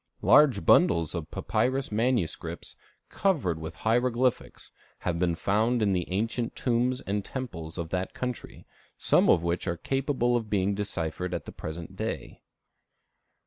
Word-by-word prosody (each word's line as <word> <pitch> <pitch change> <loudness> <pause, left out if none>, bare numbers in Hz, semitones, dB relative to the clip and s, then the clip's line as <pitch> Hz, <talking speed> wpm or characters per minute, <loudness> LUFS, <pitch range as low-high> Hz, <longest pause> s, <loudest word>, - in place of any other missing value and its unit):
Large 140 - +5
bundles 85 -1 +4
of 85 -3 -5
papyrus 130 0 -1
manuscripts, 115 -5 -1 0.3
covered 140 - 0
with 80 0 -7
hieroglyphics, 125 +2 0 0.3
have 85 -2 -1
been 85 -2 +1
found 110 +6 +1
in 100 -2 +2
the 90 -1 -2
ancient 115 +4 -1
tombs 125 +1 0
and 100 +1 -2
temples 90 -13 -6
of 85 -2 -4
that 90 +1 -3
country, 125 -1 -5 0.3
some - - +3
of 85 - +5
which 85 +1 -1
are 85 - -1
capable 135 - 0
of 115 -3 -2
being 100 -1 +1
deciphered 90 -3 -3
at 85 - -5
the - - -8
present 80 +1 -7
day. - - -5
105 Hz, 145 wpm, -28 LUFS, 85-125 Hz, 0.3 s, Large